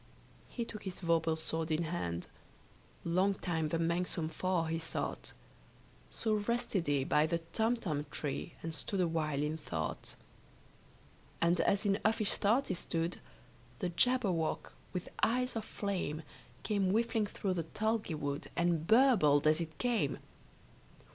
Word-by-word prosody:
He 235 - -3
took 215 -2 -8
his 190 -2 -6
vorpal 165 -2 +2
sword 160 0 -2
in 160 +1 +1
hand: 90 - -2 0.8
Long 185 +4 +3
time 165 -4 -1
the 165 - 0
manxome 170 0 0
foe 180 +1 +1
he 165 0 -1
sought. 165 - -3 0.8
So 220 -1 -1
rested 210 -4 0
he 140 -2 +2
by 150 +3 +3
the 170 +1 +1 0.2
Tumtum 215 -11 0
tree, 150 +3 -4
And 165 0 -3
stood 195 +4 -3
awhile 155 -4 +1
in 155 +1 -1
thought. 80 - -4 1.2
And 170 +1 +3
as 200 +2 +2
in 200 +1 +2
uffish 215 -1 +3
thought 235 +7 +2
he - - +1
stood, 170 -1 -2 0.6
The 180 - -1
Jabberwock 195 -6 +1 0.2
with 180 -2 -4
eyes 250 +2 +2
of 220 -1 -2
flame, 180 -6 -2 0.4
Came 200 -3 +1
whiffling 225 +1 +2
through 195 -2 -2
the 170 -3 -2
tulgey 220 -1 -1
wood, 145 -1 -3
And 170 -2 +1
burbled 215 - +5
as 155 +2 +5
it 160 -2 -5
came! 245 -3 +1
170 Hz, 140 wpm, -34 LUFS, 160-210 Hz, 1.2 s, burbled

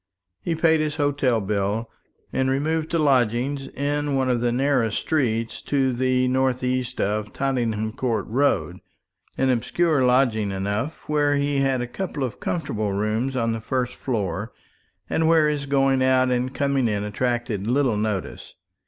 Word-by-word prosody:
He 165 - -1
paid 160 0 +3
his 155 -1 -1
hotel 145 -5 +1
bill, 105 +2 -1 0.5
and 130 0 +1
removed 155 +4 0
to 170 - 0
lodgings 135 -1 +1
in 145 +1 -1
one 130 -1 +1
of 120 -2 0
the 120 0 +1
narrow 130 -2 +2
streets 115 -2 -1
to 135 -2 +1
the 130 +1 +1
north 130 0 +1
east 125 -1 -1
of 105 +1 -1
Tottenham 115 -5 -1
Court 115 -3 -1
Road; 140 +5 0 0.6
an 135 -1 +2
obscure 145 +5 +1
lodging 125 -5 +2
enough, 100 +9 -3
where 145 -1 +2
he 140 0 0
had 135 -2 +1
a 120 - -3
couple 150 +1 -4
of 125 -2 -4
comfortable 110 - -2
rooms 110 +6 -1
on 115 -2 +1
the 115 0 -3
first 125 +1 -2
floor, 105 -3 -3 0.6
and 160 - +1
where 160 -2 +5
his 145 -2 -2
going 135 -1 +2
out 130 0 +3
and 125 +1 0
coming 140 -3 +1
in 105 -2 -1
attracted 115 -1 -2
little 130 -2 +2
notice. 105 -2 -3
130 Hz, 160 wpm, -23 LUFS, 115-140 Hz, 0.6 s, where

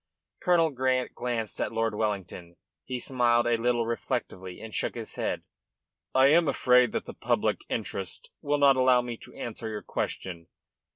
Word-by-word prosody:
Colonel 170 -3 +3
Grant 130 -1 0
glanced 120 -3 -3
at - - -1
Lord 115 0 0
Wellington. 95 -5 -3 0.3
He 130 - -3
smiled 120 -1 +2
a 120 0 +3
little 120 0 +1
reflectively 95 -4 -3
and 110 -1 -9
shook - - -1
his 115 -2 -7
head. - - -2 0.7
"I 130 0 +6
am 165 +2 +5
afraid 125 -3 +4
that - - -2
the - - -8
public - - 0
interest 95 -4 -4
will 145 +1 +1
not 140 -1 +6
allow 130 -1 +5
me 120 -1 -4
to - - -15
answer 115 -1 -5
your 105 -1 -5
question. 85 -3 -4
120 Hz, 165 wpm, -28 LUFS, 110-130 Hz, 0.7 s, I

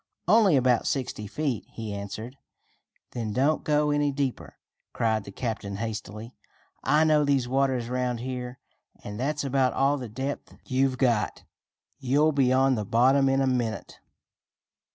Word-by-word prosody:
"Only 205 -3 +5
about 125 -2 +2
sixty 125 -6 -2
feet," 135 +1 -2
he 110 -2 -7
answered. 105 +5 -6 0.8
"Then 110 -3 -4
don't 140 +6 +1
go 150 0 +2
any 145 0 +1
deeper!" 135 -2 -3 0.4
cried 110 -2 0
the 100 - -9
captain 110 -3 -4
hastily. 110 +1 -6 0.5
"I 150 +3 +3
know 155 -1 +4
these 140 -4 +1
waters 130 -2 0
around 125 -1 -1
here, 125 0 -5 0.5
and 105 +1 -7
that's 145 +3 -1
about 135 -1 +1
all 140 +1 +2
the 125 -3 -6
depth 135 +6 -5
you've 130 0 +1
got. 120 -5 0 0.6
You'll 145 +4 +2
be 135 -3 +2
on 135 +1 +4
the 110 -4 -1
bottom 130 +6 +3
in 135 0 +2
a - - +2
minute." 120 -5 -2
130 Hz, 150 wpm, -26 LUFS, 115-140 Hz, 0.8 s, Only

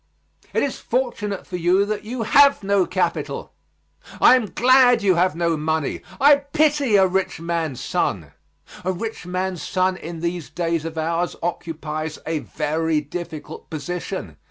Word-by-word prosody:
It - - +1
is 280 - -2
fortunate 230 -6 -2
for 180 - -5
you 180 +3 +3
that 210 0 -3
you 230 +2 -4
have 280 0 +5
no 195 -2 +2
capital. 185 0 -2 0.7
I - - +8
am 245 -4 0
glad 245 -2 +5
you 190 -2 +4
have 180 0 +2
no 170 -1 +1
money. 155 -1 -1 0.2
I 285 +1 +7
pity 285 -3 +1
a 190 -1 +6
rich 190 -2 -1
man's 165 -5 -2
son. - - -1 0.5
A 185 - 0
rich 190 0 -5
man's 185 -1 -2
son 185 +2 0
in 165 -1 -7
these 170 -1 -3
days 165 -2 -2
of 165 0 -6
ours 165 +2 -1
occupies 155 -2 -4
a 160 -1 -1
very 155 +1 -1
difficult 155 0 -7
position. 165 - -5
180 Hz, 155 wpm, -22 LUFS, 165-210 Hz, 0.7 s, I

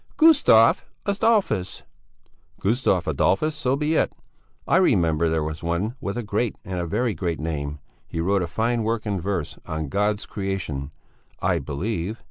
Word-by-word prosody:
"Gustavus 285 - +6 0.2
Adolfus." 200 - +1 0.8
"Gustavus 100 -5 +1
Adolfus, 125 - +2
so 130 -3 0
be 150 +2 0
it! - - +2 0.6
I - - +4
remember 85 - +3
there 80 -1 0
was 80 +1 -4
one 85 +7 -1
with 100 +4 -3
a 120 - -2
great, 105 +2 -1
a 90 -3 -3
very 120 +7 0
great 85 -1 -2
name; 75 -2 -3 0.3
he 80 - -5
wrote 95 +3 +2
a 85 - -1
fine 115 +7 0
work 115 0 -1
in 100 -4 -1
verse, 90 -4 -3
on 80 -2 -3
God's 105 +4 0
Creation, 95 -9 -4 0.5
I - - +1
believe! 95 +6 -3
100 Hz, 150 wpm, -24 LUFS, 85-115 Hz, 0.8 s, Gustavus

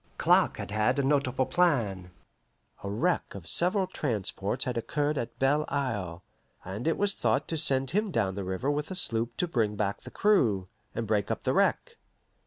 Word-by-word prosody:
Clark - - +3
had - - -6
had 110 +5 +1
a 140 - +1
notable 135 -2 +1
plan. 115 - +1 0.7
A 100 - -4
wreck 125 - -1
of 95 -5 -9
several 185 - +1
transports 105 - -2
had 125 -2 -2
occurred 145 +6 -1
at 115 -4 -4
Belle 145 +3 +2
Isle, 100 -11 -3 0.4
and 100 - -5
it 165 - +1
was 205 0 +1
thought 120 +1 0
to 165 - -1
send 135 -4 +3
him 210 +4 0
down 110 - 0
the 100 +1 -4
river 95 +10 -2
with 145 0 -3
a 190 - -5
sloop 115 -9 +3
to 180 - 0
bring 110 -9 0
back 100 -1 -2
the - - -10
crew, 115 - +2 0.3
and 115 - -2
break 105 -1 0
up - - -3
the - - +1
wreck. - - +1
125 Hz, 190 wpm, -28 LUFS, 105-150 Hz, 0.7 s, Clark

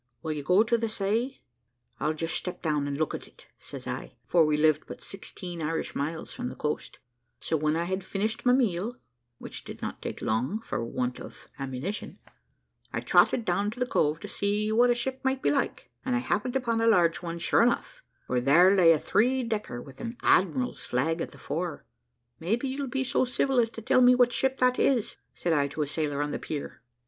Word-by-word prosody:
Will 160 - -2
you 150 -1 -3
go 180 +8 +4
to 230 +1 +1
the 230 0 -1
say?' 220 +6 -1 0.6
`I'll 155 +1 0
just 165 +1 -3
step 180 0 -5
down 150 -3 0
and 140 -1 -3
look 155 0 0
at - - -6
it,' - - -20
says - - -9
I, - - -5
for 170 -2 +4
we 150 -1 +2
lived 155 0 +3
but - - -8
sixteen 180 -3 -8
Irish 160 +1 -2
miles 155 +3 -4
from 250 0 -4
the - - -8
coast; 150 0 -3 0.4
so - - -1
when 155 0 +1
I 165 - 0
had 190 +2 -2
finished 215 +3 -2
my 250 - +5
meal, 235 -2 +1 0.4
which - - -8
did - - -9
not - - -5
take - - -5
long, 125 - 0
for 170 - -3
want 125 +1 -2
of - - -11
ammunition, 135 +9 -4 0.7
I - - -2
trotted 235 - +4
down 200 +4 +1
to 235 +4 -8
the 250 - +2
Cove 155 - +1
to - - -6
see 205 +1 -1
what 240 +3 +5
a 240 - +4
ship 260 +2 -2
might 265 0 0
be - - +3
like, 280 - -2
and 255 -1 0
I - - +2
happened 245 +1 -1
upon 235 -3 +1
a 230 - +3
large 175 -7 +4
one 170 -1 -4
sure 170 - +3
enough, 245 - 0 0.2
for 125 -1 0
there 175 +9 +6
lay 175 -4 +7
a 155 - 0
three 250 - +2
decker 210 - -3
with 135 -1 -13
an 235 0 -5
admiral's 250 +7 +2
flag 160 +7 0
at - - -3
the - - -14
fore. 165 0 -4 0.6
`Maybe 220 +10 0
you'll 270 +1 -2
be 265 +1 -1
so 260 - +1
civil 255 +1 +1
as 230 -1 +3
to 225 -1 -10
tell 255 - +4
me 250 0 +7
what 245 -1 +4
ship 265 +1 +1
that 250 0 +3
is,' 245 -6 +1 0.2
said 170 - 0
I 145 -2 +2
to 150 +2 -2
a - - -2
sailor 145 0 -1
on 145 - -3
the - - -3
pier. 145 -2 -6
195 Hz, 220 wpm, -28 LUFS, 155-245 Hz, 0.7 s, lay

